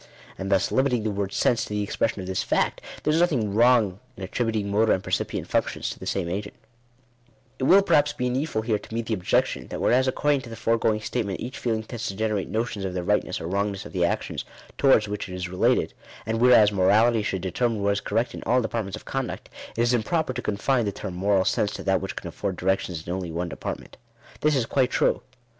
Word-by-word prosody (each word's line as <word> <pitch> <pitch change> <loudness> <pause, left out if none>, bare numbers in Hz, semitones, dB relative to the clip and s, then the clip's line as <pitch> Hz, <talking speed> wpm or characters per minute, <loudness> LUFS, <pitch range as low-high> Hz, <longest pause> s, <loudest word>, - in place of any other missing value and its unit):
And 95 +1 -5
thus, 95 -1 +2
limiting 130 -4 +2
the 110 - 0
word 100 -1 -2
sense 120 +2 +2
to - - -12
the 105 0 -1
ex 100 - -5
pression 115 -3 0
of - - -7
this 95 0 -1
fact, - - 0 0.2
there 150 - +2
is 160 - +3
nothing 130 - +1
wrong 115 -4 +4 0.2
in 95 - -7
attributing 110 0 -1
motor 110 +2 +4
and 95 - -1
percipient - - -2
functions - - -1
to - - -9
the - - -7
same 95 -3 -1
agent 100 +4 -4 1.0
It 130 - 0
will 195 +7 +7
perhaps 145 -6 +3
be 125 -4 -2
needful 125 -2 -1
here 110 -2 0
to 105 - -12
meet 115 0 -2
the 110 - -1
objection, 90 -4 0
that - - -5
whereas 130 +2 +3
according 145 +1 +1
to 125 - -10
the 115 - -7
foregoing 115 -1 +1
statement 105 -3 -2
each 130 +3 -6
feeling 110 -2 -1
tends 115 0 -5
to 95 - -4
generate 105 -2 -1
notions 110 -3 -2
of 95 -1 -3
the 90 - -2
rightness - - 0
or - - -6
wrongness 100 +2 -2
of - - -10
the 90 -2 +1
actions 85 - -1 0.3
towards 130 -6 +4
which 105 -1 -4
it 90 - -6
is 90 0 -3
related; 90 +1 +2 0.3
and 110 0 -1
whereas 115 -4 +7
morality 105 +4 +4
should 95 -3 -2
de 95 - -2
termine 115 0 0
what 100 - +3
is 100 - -2
correct 115 +3 -1
in - - -7
ail 125 +3 +4
departments 110 -4 -2
of - - -11
conduct, - - -4 0.3
it - - +2
is 120 +1 +2
im 120 - +3
proper 160 +3 -1
to 125 - -4
confine 115 +4 0
the 100 - 0
term 95 -1 -6
"moral 95 +1 +2
sense" 105 - +1
to - - -6
that 95 -1 +2
which 95 - -5
can - - -6
afford 95 -2 -3
directions 90 -3 -1
in 85 - -3
only 90 -3 -4
one 85 +2 -3
department. - - -6 0.4
This 150 -1 +2
is 125 -4 +1
quite 130 +1 +1
true. - - +1
110 Hz, 235 wpm, -25 LUFS, 95-120 Hz, 1.0 s, will